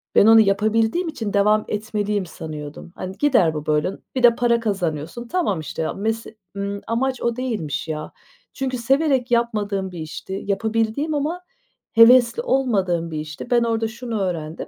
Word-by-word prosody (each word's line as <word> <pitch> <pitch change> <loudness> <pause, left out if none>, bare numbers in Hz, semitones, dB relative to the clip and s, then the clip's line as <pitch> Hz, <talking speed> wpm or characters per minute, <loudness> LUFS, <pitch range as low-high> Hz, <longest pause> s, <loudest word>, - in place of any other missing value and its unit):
Ben - - +7
onu 225 0 +8
yapabildiğim 220 - +1
için 225 -10 -4
devam 210 +1 +3
etmeliyim 210 -2 -2
sanıyordum. 155 0 -8
Hani, 185 +2 -6
gider 235 - +3
bu 150 0 -5
böyle, 150 +4 +1
n - - -11 0.2
bir 255 - -1
de 235 -1 +7
para 235 -1 +2
kazanıyorsun. 195 0 -3
Tamam, 320 - 0
işte 155 - -5
ya, 155 - -1
mese 220 +2 -3 0.2
ımm, 200 0 -3
amaç 255 +3 -1
o 235 -1 0
değilmiş, 185 - -3
ya. 155 -1 -5 0.4
Çünkü 260 -2 -2
severek 265 0 +1
yapmadığım 210 -5 0
bir 175 - -8
işti. 190 +5 -6
Yapabildiğim 225 +8 0
ama 310 +5 -2 0.5
hevesli 240 - +6
olmadığım 195 - 0
bir 155 - -3
işti. 155 +8 -7
Ben 240 -1 +4
orada 225 -1 0
şunu 235 -2 -4
öğrendim. 165 -4 -3
220 Hz, 165 wpm, -22 LUFS, 185-240 Hz, 0.5 s, onu